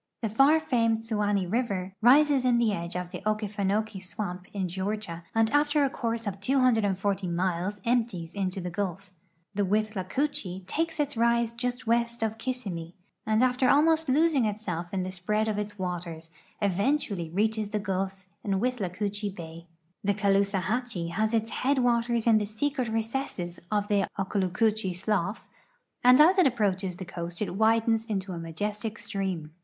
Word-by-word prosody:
The 220 - +1
far 275 +9 +5
famed 230 -7 +2
Suwanee 210 -3 0
river 195 -3 -1
rises 275 +3 +6
in 250 -2 +3
the 230 -3 +2
edge 170 -2 -4
of 180 0 -4
the 180 - -5
Okefenokee 210 -1 -1
swamp 185 -1 -5
in 195 -3 -2
Georgia, 190 -1 -4
and 225 0 +3
after 290 0 +3
a 275 - +1
course 230 -2 -2
of 200 -1 -4
240 205 -6 +2
miles 180 +3 -1
empties 225 -9 0
into 190 -1 -2
the 180 -1 -4
Gulf 195 0 -4 0.4
The 205 - 0
Withla 205 -1 -1
coochee 265 -11 -2
takes 325 - -2
its 290 -2 0
rise 235 0 +2
just 245 +1 -3
west 235 0 +1
of 220 0 -2
Kissimmee, 190 -10 -4 0.3
and 220 +2 +3
after 255 0 +3
almost 320 +1 +4
losing 290 -2 +3
itself 190 -5 -3
in 190 -2 -1
the 185 - -4
spread 210 +4 -1
of 210 -1 -1
its 205 0 -5
waters, 170 -3 -5 0.3
eventually 200 - 0
reaches 215 +4 0
the 210 - -1
Gulf 195 -1 -3 0.2
in 195 -2 0
Withlacoochee 205 -3 -2
bay. 165 -1 -9 0.4
The 200 0 +1
Caloosahatchee 200 0 0
has 215 +5 0
its 225 -1 0
head 275 +2 +2
waters 235 -2 +2
in 225 -2 +5
the 210 - -2
secret 255 +4 -1
rece.sses 220 -6 -3
of 205 -1 0
the 200 -2 +2
Okaloocoochee 195 +1 0
slough, 200 +1 -1 0.6
and 250 +2 +7
as 355 +6 +7
it 360 - +6
approaches 195 -6 0
the 185 - -7
coast 170 -1 -6
it 210 - -2
widens 225 +1 +3
into 195 -4 -3
a 170 - -5
majestic 205 +7 -4
stream. 190 -7 -3
210 Hz, 160 wpm, -28 LUFS, 185-235 Hz, 0.6 s, and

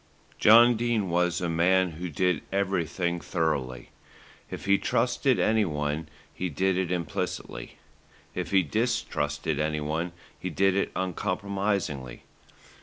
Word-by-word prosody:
John 120 +2 +7
Dene 115 -5 0
was 90 +1 +1
a 90 - 0
man 90 +2 +3
who 85 +3 -6
did 90 +1 +1
everything 90 -3 -1
thoroughly. 65 -6 -2 0.6
If - - -7
he 100 0 +4
trusted 125 +2 +1
anyone, 80 -8 0 0.2
he 90 - -3
did 95 +5 +1
it 90 -1 -1
implicitly; 85 -8 -4 0.6
if 90 -2 -3
he 95 0 +4
distrusted 75 - -1
anyone, 75 +3 -1 0.3
he - - -4
did 95 -1 +2
it 100 - 0
uncompromisingly. 95 - -2
90 Hz, 115 wpm, -27 LUFS, 80-100 Hz, 0.6 s, John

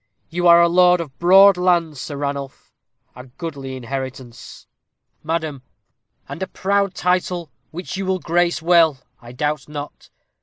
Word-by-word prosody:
You 175 +1 0
are 170 0 +7
lord 180 +1 +4
of 150 -6 -7
broad 195 +2 +6
lands, 170 -5 0
Sir 145 - -6
Ranulph 140 -1 -6 0.4
a 125 - -11
goodly 135 -1 -7
inheritance." 130 -1 -8 0.6
"Madam!" 160 -3 -3 0.7
"And - - -8
a 190 - -2
proud 200 +1 -1
title, 180 -2 -1 0.2
which 180 +3 -7
you 195 -1 -4
will 190 0 0
grace 175 -1 0
well, 165 -4 +4 0.2
I 120 0 -12
doubt 150 +3 -3
not. 150 -1 -9
165 Hz, 140 wpm, -20 LUFS, 140-180 Hz, 0.7 s, are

